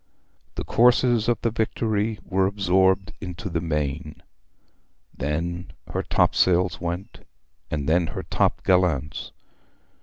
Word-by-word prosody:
The - - -3
courses 120 -1 +3
of 120 -2 +1
the 115 - +1
Victory 110 -1 -1
were 95 0 +2
absorbed 95 -1 +2
into 90 -1 -6
the 85 0 -1
main, 75 -2 -3 0.9
then 85 +5 -3 0.2
her - - 0
topsails 90 -1 +2
went, 90 +6 -4 0.5
and 70 -2 -2
then 85 +1 +3
her - - -5
top - - 0
gallants. 85 -5 +1
90 Hz, 115 wpm, -24 LUFS, 85-105 Hz, 0.9 s, courses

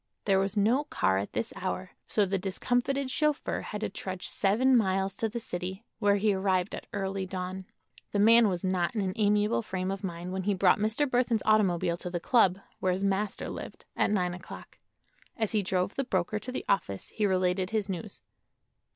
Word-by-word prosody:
There 195 -2 +4
was 195 +2 -1
no 235 +8 +3
car 95 - +1
at 100 - -5
this 110 - -2
hour, 185 0 -4 0.2
so 210 - +2
the 195 0 -1
discomfited 245 +8 0
chauffeur 300 0 0
had 210 - -6
to - - -1
trudge 185 -1 -5
seven 235 +7 +3
miles 195 -3 +2
to 225 - 0
the 235 +2 -4
city, 185 0 -4 0.2
where 205 -2 +4
he 205 +1 +2
arrived 190 -1 0
at - - -7
early 195 -1 -2
dawn. 185 0 -5 0.5
The - - -1
man 225 +2 +6
was 180 -2 -3
not 185 +1 0
in 215 - +1
an 190 -1 -1
amiable 210 +1 +2
frame 190 -3 -3
of 195 +1 -5
mind 175 0 -5
when 190 - -2
he 205 -1 +2
brought 185 +1 +4
Mr. 220 +8 +1
Burthon's 245 -3 +1
automobile 185 -6 +3
to 180 - -5
the 175 0 -2
club, 190 -2 +3 0.2
where 185 - +1
his 190 +2 -2
master 200 +1 -1
lived, - - -8
at - - +2
nine 180 -4 +1
o'clock. 180 0 -10 0.6
As 220 -2 0
he 215 - +2
drove 185 0 0
the 275 - -1
broker 195 -3 -1
to 255 - -6
the 260 - -4
office - - -1
he 210 -2 0
related 185 0 +1
his 215 -2 -1
news. 180 -4 -6
195 Hz, 200 wpm, -29 LUFS, 185-220 Hz, 0.6 s, man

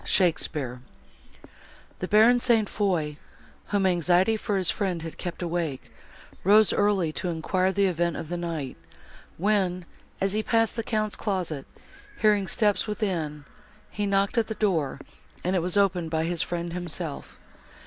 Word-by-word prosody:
SHAKESPEARE 150 -8 0 1.2
The 185 - -3
Baron 225 +5 +6
St. 230 -4 +3
Foix, 170 -9 -1 0.5
whom 200 -2 +1
anxiety 180 +3 +3
for 210 -2 -1
his 185 -2 +1
friend 185 -6 -2
had 165 - -8
kept 175 0 -5
awake, 165 -5 -3 0.5
rose 210 +2 +6
early 195 -6 +2
to 180 - -3
enquire 185 +3 0
the 200 +1 +2
event 175 -2 0
of - - -5
the 175 - -2
night, 165 - -4 0.6
when, 185 -2 +1 0.3
as 195 0 0
he 215 - +1
passed 225 0 +1
the 230 - -1
Count's 215 -2 -1
closet, 180 -9 -3 0.5
hearing 210 -3 +3
steps 210 +2 +1
within, 170 -9 -2 0.5
he 205 -1 -2
knocked 200 +3 +2
at 225 - 0
the 220 - -4
door, 165 -11 0 0.4
and 185 +2 0
it 180 - +2
was 180 +3 0
opened 185 -4 +2
by 160 0 0
his 170 0 0
friend 170 -1 -3
himself. 170 -3 -4
185 Hz, 150 wpm, -26 LUFS, 170-205 Hz, 1.2 s, Baron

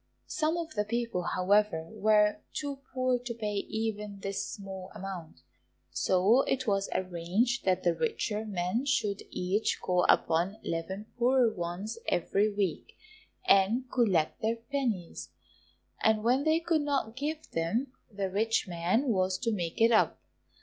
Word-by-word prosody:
Some 315 +2 0
of 330 -2 -4
the 210 - 0
people, 230 -3 -2
however, 185 -3 +2
were 210 0 +3
too 285 -2 -4
poor 255 -1 +1
to 245 0 -5
pay 210 -2 -3
even 210 -1 -3
this 195 0 -2
small 190 -2 -7
amount, 190 -5 -7 0.5
so 185 - +3
it 260 -1 0
was 195 -3 0
arranged 185 +7 0
that 185 -1 +2
the 175 - +3
richer 215 +2 -1
men 205 +4 -1
should 215 -8 +1
each 190 +4 0
call 180 -1 +1
upon 170 +5 +3
eleven 190 +5 -3
poorer 245 -2 +4
ones 190 +5 -4
every 200 +4 +1
week, 200 -4 -2 0.5
and 230 - +3
collect 200 -6 +2
their 225 +1 +1
pennies, 230 -7 -3 0.7
and 220 -1 +3
when 255 +5 +2
they 315 +1 +4
could 330 -2 +1
not 275 -6 -1
give 305 +4 -4
them, 225 +11 -1 0.2
the 200 -1 -2
rich 220 +3 +1
man 175 +7 +1
was 185 -3 +1
to 230 +4 -1
make 175 -6 -3
it 230 +1 +5
up. 220 - +3
210 Hz, 145 wpm, -30 LUFS, 185-240 Hz, 0.7 s, it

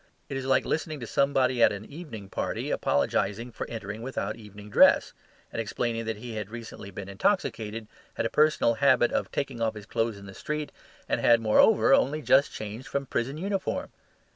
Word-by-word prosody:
It 140 - -4
is 135 - -4
like 135 -1 +3
listening 155 -1 -2
to - - -4
somebody 130 -1 +2
at - - +7
an 100 +1 -6
evening 140 - -9
party - - -3
apologising 105 +10 0
for - - -6
entering 110 -1 -6
without 115 -5 -3
evening 105 -2 -12
dress, - - +5 0.4
and - - -2
explaining 115 +1 -2
that 110 -1 -3
he 120 +1 -7
had 105 -2 -5
recently 115 -3 -8
been 100 0 -7
intoxicated, 110 - -1 0.3
had - - -1
a - - +1
personal 150 -6 +3
habit - - +5
of - - -1
taking 115 - -3
off 110 -1 0
his 105 -1 -9
clothes 115 0 -1
in 100 - -11
the 95 - -10
street, 150 +7 -4 0.4
and - - 0
had, 115 -1 +6
moreover, 210 - +5
only 155 - +2
just 140 +1 +4
changed 110 +5 -7
from 140 0 -2
prison 130 +2 -2
uniform. 195 +3 -2
115 Hz, 190 wpm, -27 LUFS, 105-140 Hz, 0.4 s, at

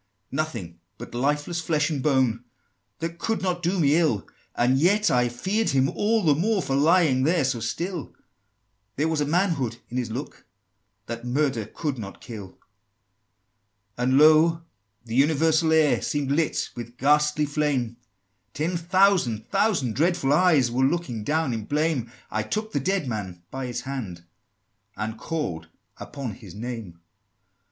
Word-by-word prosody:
"Nothing 115 - -4 0.2
but - - -10
lifeless 145 +6 -1
flesh 155 -2 0
and 145 -3 -2
bone, 130 -5 +2 0.6
That 165 +1 -4
could 225 -3 -1
not 180 -2 -1
do 180 +2 0
me 145 -2 +4
ill; 150 - +1 0.3
And 125 +2 +3
yet 205 +6 +3
I 125 -1 +3
feared 195 - -1
him 135 -1 +3
all 220 +1 +1
the 155 -3 +5
more, 195 +6 +1
For 135 - -1
lying 155 -2 +4
there 160 +1 +2
so 130 -3 -1
still: 170 - -4 0.8
There 150 +3 +1
was 160 -2 0
a 145 - 0
manhood 160 - 0
in 125 - -4
his 125 -2 -2
look, 125 +6 -7 0.6
That 115 +1 -6
murder 125 -3 0
could 145 -6 -4
not 100 -3 -8
kill!" 105 -5 -8
XVII. - - -32 1.4
"And, 130 +2 +2
lo! 155 +2 +5 0.4
the 115 - -7
universal 160 +4 +3
air 155 -2 +4
Seemed 145 -2 -1
lit 155 +2 0
with 120 0 -8
ghastly 150 +2 +3
flame; 140 -6 -1 0.6
Ten 170 +4 -1
thousand 175 - +2
thousand 160 - +1
dreadful 160 - +2
eyes 150 -7 +4
Were 130 +2 +1
looking 135 -7 -1
down 150 0 0
in 110 -2 -4
blame: 145 -5 0 0.2
I 110 - 0
took 215 - -3
the 145 - 0
dead 185 +1 -1
man 95 -7 -5
by 135 -1 -4
his 120 0 -4
hand, 115 -11 -6 0.7
And 110 +2 -4
called 90 - -3 0.3
upon 135 -6 -6
his - - -12
name!" 110 -6 -6
145 Hz, 155 wpm, -25 LUFS, 120-165 Hz, 1.4 s, the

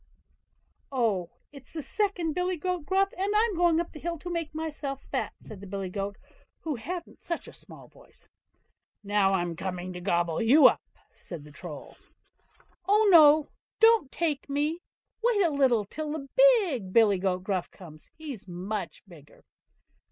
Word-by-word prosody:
"Oh! 215 -9 0 0.2
it's 275 -3 -13
the 315 -2 -5
second 360 - -1
billy 360 +2 -1
goat 360 -2 -3
Gruff, 390 +1 +2
and 400 +3 -1
I'm 435 -1 +2
going 340 -1 +3
up 340 - -2
to - - -22
the 305 - -9
hill 340 +1 -3
side 315 - -14
to 355 - -6
make 330 -3 -4
myself 295 -3 -5
fat", - - -2
said 205 -3 -11
the 200 - -9
billy 190 -1 -5
goat, 200 0 -4 0.4
who 315 - -3
hadn't 340 +8 -7
such 340 - -4
a - - -11
small - - -13
voice. - - -19 0.8
"Now, 200 -1 +2
I'm 175 -3 -1
coming 180 0 -5
to 180 - -7
gobble 175 -2 0
you 260 +6 +6
up", - - +6 0.3
said 170 -5 -9
the 150 - -14
Troll. 155 -2 -10 0.9
"Oh, 420 +1 +4
no! 305 -3 +7 0.3
don't 450 - +5
take 305 -5 -2
me, 300 +4 -1 0.4
wait 460 -4 +3
a 330 - +1
little 260 -7 +2
till 300 +8 -5
the 285 -3 -6
big 400 - +4
billy 205 -3 +4
goat 185 -1 -1
Gruff 185 -2 -2
comes, 155 -5 -13
he's 275 -10 -8
much 190 +4 -5
bigger." 155 -5 -17
280 Hz, 170 wpm, -28 LUFS, -, 0.9 s, no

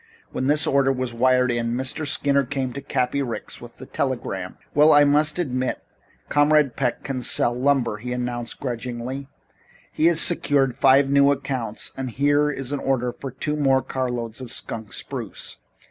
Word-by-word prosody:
When 130 - -2
this 150 +2 +3
order 140 -3 +3
was 130 -2 -3
wired 125 +1 +3
in, 120 0 -1
Mr. 135 +4 -3
Skinner 140 0 +2
came 130 -1 -3
to 140 - -6
Cappy 135 0 -1
Ricks 120 -4 -5
with - - -11
the - - -11
telegram. - - -3 0.2
"Well, 150 +2 +6
I 145 -1 +7
must 150 +2 +2
admit 130 -7 -2 0.4
Comrade 145 -3 +3
Peck 125 -3 -1
can 135 -2 -3
sell 120 0 +2
lumber," 130 -3 +1
he 125 +4 -6
announced 120 -1 -4
grudgingly. 125 +1 -5 0.6
"He 160 - +2
has 170 -1 +4
secured 140 -7 +3
five 135 +1 +5
new 140 0 +5
accounts 130 -5 -3
and 130 -1 -4
here 145 +4 +2
is 135 -2 -4
an 145 - -2
order 125 -2 -1
for 135 - -7
two 145 +4 -3
more 135 -3 +2
carloads 120 -3 -4
of 125 -2 -8
skunk 110 -4 -5
spruce. - - -5
135 Hz, 170 wpm, -23 LUFS, 125-140 Hz, 0.6 s, I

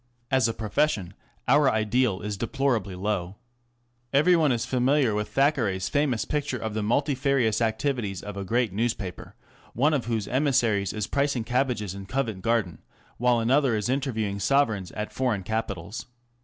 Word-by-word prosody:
As 130 -3 +4
a 115 - -1
profession, 105 - 0 0.3
our 140 +1 +5
ideal 110 -1 +1
is 105 0 -3
deplorably 115 -4 -1
low. 95 -1 -2 0.8
Every 155 +6 +5
one 155 -4 +3
is 120 -2 0
familiar 130 -1 +2
with 105 0 -2
Thackeray's 115 -7 +1
famous 145 -6 +1
picture 145 -3 -2
of 110 -2 -4
the 110 - -1
multifarious 130 -1 +1
activities 110 -3 -1
of 105 -1 -7
a 100 - -4
great 115 +1 0
newspaper, 105 -4 -3 0.4
one 145 +6 +2
of 135 -6 0
whose 110 -4 -2
emissaries 120 -8 +1
is 105 -1 -3
pricing 140 -2 0
cabbages 120 -5 -1
in 100 0 -8
Covent 115 -6 -2
Garden 115 -5 0 0.4
while 125 0 +3
another 130 +1 +3
is 105 +1 -1
interviewing 110 -7 -1
Sovereigns 110 -5 +1
at 105 0 -5
foreign 120 -7 0
capitals. 100 -2 -4
115 Hz, 155 wpm, -26 LUFS, 105-135 Hz, 0.8 s, our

